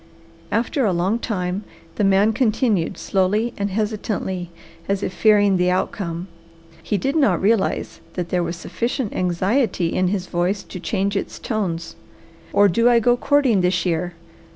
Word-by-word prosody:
After 245 +4 0
a 200 -5 +2
long 185 +7 0
time 185 -3 -2 0.3
the 210 - -1
man 195 +3 +4
continued 220 -6 +1
slowly 205 +5 0
and 200 0 -2
hesitantly, 200 -3 -2 0.4
as 200 0 0
if - - -2
fearing 205 -3 +4
the 180 0 +2
outcome. 180 -1 -2 0.5
He 205 - -1
did 270 - -1
not 245 - +3
realize 215 0 0
that 175 -2 -4
there 180 - +1
was 170 0 -2
sufficient 235 - -3
anxiety 185 +1 0
in 185 - +1
his 190 -1 -1
voice 185 +3 -1
to 185 - -8
change 195 +3 -1
its 195 - -3
tones. 175 -7 -3 0.6
"Or 205 0 +5
do 230 +6 +3
I 240 -1 +5
go 240 +2 +3
courting 260 -6 +2
this 180 0 +1
year? 175 0 -1
195 Hz, 155 wpm, -21 LUFS, 180-220 Hz, 0.6 s, Or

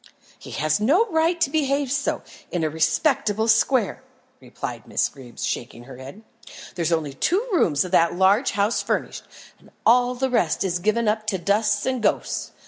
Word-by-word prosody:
"He - - -12
has 155 +3 +1
no 300 - +3
right 330 +2 +1
to 275 - +2
behave 280 -3 0
so, 285 0 -1 0.3
in 175 -2 -2
a 155 - 0
respectable 165 +7 +1
square," 225 0 +2 0.4
replied - - -7
Miss - - +1
Greeb, 125 -3 -14
shaking 120 0 -4
her 130 0 -12
head. 135 - -11 0.5
"There's 170 -2 -2
only 155 -4 -1
two 380 - 0
rooms 160 - +2
of 180 - -7
that 170 -2 +3
large 195 +7 +3
house 205 +2 +1
furnished, - - -3 0.3
and - - -20 0.2
all 245 +2 +4
the 260 +1 -1
rest 175 -10 +1
is 180 -2 -1
given 215 +4 0
up 215 0 0
to 200 -3 0
dust 205 +3 0
and 255 -2 -1
ghosts. - - -1
210 Hz, 175 wpm, -23 LUFS, 165-255 Hz, 0.5 s, all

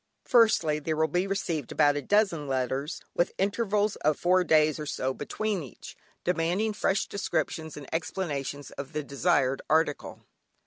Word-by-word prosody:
Firstly, 220 -10 +4
there 155 +1 -2
will 160 +1 +2
be 180 +5 0
received 170 -8 -2
about 145 0 +3
a 145 - -1
dozen 180 -3 +1
letters, 135 +3 -2
with 175 - +1
intervals 205 +1 0
of 155 0 +1
four 180 +1 +3
days 155 -2 +3
or 150 - -5
so 130 -2 -2
between 205 +8 -2
each, 130 -8 -11 0.3
demanding 180 +5 0
fresh 195 -1 +1
descriptions 160 -6 -3
and 145 -2 -9
explanations 145 -5 -3
of 140 -1 -8
the 150 - -2
desired 140 -2 +1
article. 155 -2 0
160 Hz, 150 wpm, -28 LUFS, 145-190 Hz, 0.3 s, Firstly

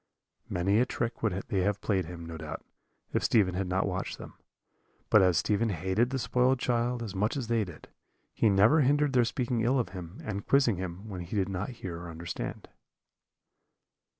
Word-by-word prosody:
"Many 95 +4 +2
a 125 - +4
trick 120 -1 -3
would 115 -5 +1 0.2
they 95 - +1
have 100 +2 +1
played 95 -5 0
him, 85 0 -8
no 85 0 -7
doubt, 80 0 -7 0.5
if - - +1
Stephen 100 -5 +3
had 95 +1 -2
not 95 +1 +1
watched 95 -1 -3
them. - - -10 0.8
But 110 - +7
as 90 -3 +4
Stephen 105 +8 +1
hated 95 +6 +1
the 135 - -1
spoiled 125 +1 +2
child 120 -1 0
as 105 -4 -5
much 105 +7 0
as 130 - -2
they 115 -2 +2
did, 90 -6 -10 0.5
he 110 - +3
never 105 +10 +5
hindered 145 +1 +3
their 125 -2 +4
speaking 120 0 -1
ill 125 +4 +2
of 120 -8 0
him, 90 0 -8
and 100 -2 -4
quizzing 135 -8 +4
him, 95 +3 -6
when 95 -4 -6
he 85 +5 -6
did 100 -2 +1
not 95 +1 -3
hear 90 -9 -6
or 85 0 -8
understand. 85 +1 -6
100 Hz, 195 wpm, -29 LUFS, 90-120 Hz, 0.8 s, But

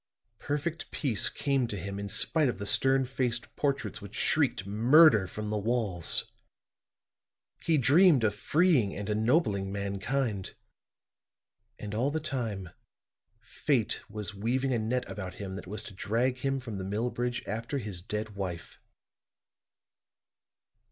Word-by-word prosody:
Perfect 150 +3 -3
peace 125 -8 0
came 135 -3 0
to 105 - -4
him 100 +2 -5
in 100 0 -5
spite 145 +7 +2
of - - -3
the 100 - -5
stern 135 +5 +4
faced 125 -2 -2
portraits 135 -8 -1
which 100 0 -10
shrieked 140 -10 +1
murder 115 - +6
from 105 +2 -5
the 105 - 0
walls. 105 -6 0 1.3
He 160 -2 +3
dreamed 145 0 +5
of 105 -2 +2
freeing 150 - +2
and 100 0 -5
ennobling 110 - +1
mankind, 100 +2 -2 1.2
and 105 -1 -6
all 120 +6 +1
the 160 +2 -1
time 115 - -3 0.7
Fate - - 0
was 105 -1 -5
weaving 125 +6 0
a 120 - +1
net 120 +3 -1
about 95 -3 -6
him 95 -2 -6
that 95 - -8
was 105 +3 -5
to 100 - -9
drag 120 +6 0
him 135 +1 -1
from 115 -6 -6
the - - -4
mill 105 +6 -1
bridge 120 0 -2
after 115 +7 -3
his 100 -8 -5
dead 105 +3 -4
wife." 90 -4 -6
110 Hz, 140 wpm, -29 LUFS, 100-135 Hz, 1.3 s, murder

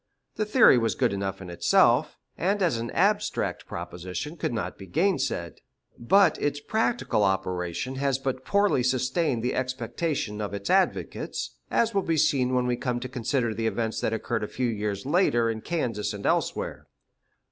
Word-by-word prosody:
This 215 -1 -2
theory 220 - +7
was 115 -1 0
good 125 -6 +1
enough 95 0 -3
in 90 - -8
itself, 125 - +3 0.2
and 195 +2 0
as 165 -10 +2
an 115 +1 -4
abstract 205 +3 0
proposition 90 - -6
could 155 - -2
not 115 -3 -3
be 95 - -11
gainsaid; 140 - 0 0.4
but 195 +12 +3
its 145 0 0
practical 220 - 0
operation 95 +4 -1
has 135 -1 +1
but 135 -1 -3
poorly 200 -4 +2
sustained 130 +1 0
the 125 - 0
expectations 130 -3 -2
of 100 -1 -3
its 100 0 -3
advocates, 190 0 0
as 230 0 +1
will 195 - +2
be 165 -3 0
seen 130 -3 +2
when 125 0 +2
we 125 -1 0
come 125 -1 -2
to 125 - -5
consider 125 -1 -1
the 115 +1 -1
events 110 0 -2
that - - 0
occurred 110 -1 -2
a - - -2
few 125 +2 -2
years 105 -2 -3
later 135 -8 +2
in 110 -1 -5
Kansas 115 -11 -2
and 100 -1 -7
elsewhere. - - -1
125 Hz, 170 wpm, -26 LUFS, 105-155 Hz, 0.4 s, theory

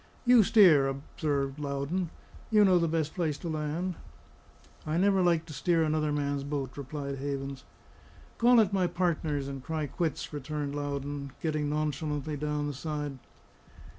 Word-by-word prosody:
"You 245 -1 +7
steer," 180 -10 +6
observed 140 0 -2
Loudon. 145 +5 -2 0.4
"You 210 -2 +6
know 185 -2 +5
the 170 - +1
best 160 -1 -1
place 160 -5 -1
to 175 - -7
land." 155 +3 -2 0.9
"I 155 +2 -1
never 195 +1 +3
like 170 -2 +2
to 160 - -9
steer 165 +4 +2
another 155 -1 +1
man's 145 -1 -1
boat," 140 -2 -4
replied 140 0 -5
Havens. 140 -1 -4 0.7
"Call 240 0 +6
it 205 -3 +3
my 185 -2 +2
partner's, 160 -5 -1
and 135 -2 -6
cry 160 0 -2
quits," 160 +2 -3
returned 145 0 -4
Loudon, 140 -1 -4
getting 155 -2 -1
nonchalantly 150 0 -2
down 150 0 -2
the 145 - -3
side. 145 -1 -4
150 Hz, 150 wpm, -29 LUFS, 140-170 Hz, 0.9 s, You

